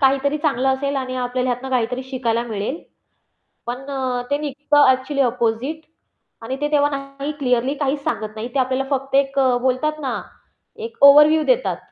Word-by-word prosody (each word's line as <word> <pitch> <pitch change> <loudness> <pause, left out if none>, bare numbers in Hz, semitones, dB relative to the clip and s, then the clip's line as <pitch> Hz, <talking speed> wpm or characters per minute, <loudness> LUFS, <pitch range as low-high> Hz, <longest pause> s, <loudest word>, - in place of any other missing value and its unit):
काहीतरी 275 +2 +2
चांगलं 270 -4 0
असेल 275 +1 0
आणि 255 -1 -3
आपल्याला 250 0 -1
ह्यातनं 250 +2 -4
काहीतरी 250 +1 -1
शिकायला 235 -3 -1
मिळेल. 220 +8 -4 0.8
पण 250 +3 -5
अ, 255 -2 -2
ते 285 - +2
निघतं 290 0 +2
ॲक्चुअली 260 +2 +1
अपोझिट 250 +5 -1 0.6
आणि 255 +3 -3
ते 295 - +1
तेव्हा 290 -1 +3
नाही 275 +1 -6
क्लिअरली 250 0 +1
काहीच 280 0 -2
सांगत 215 0 -3
नाही, 220 +2 -5
ते 275 - +1
आपल्याला 260 +1 -1
फक्त 270 +1 -4
एक 275 0 +2
अ, 255 -2 +3
बोलतात 265 +5 0
ना 265 - -3 0.6
एक 460 - -8
ओव्हरव्ह्यू 300 +2 +8
देतात. - - +1
265 Hz, 165 wpm, -20 LUFS, 250-285 Hz, 0.8 s, ओव्हरव्ह्यू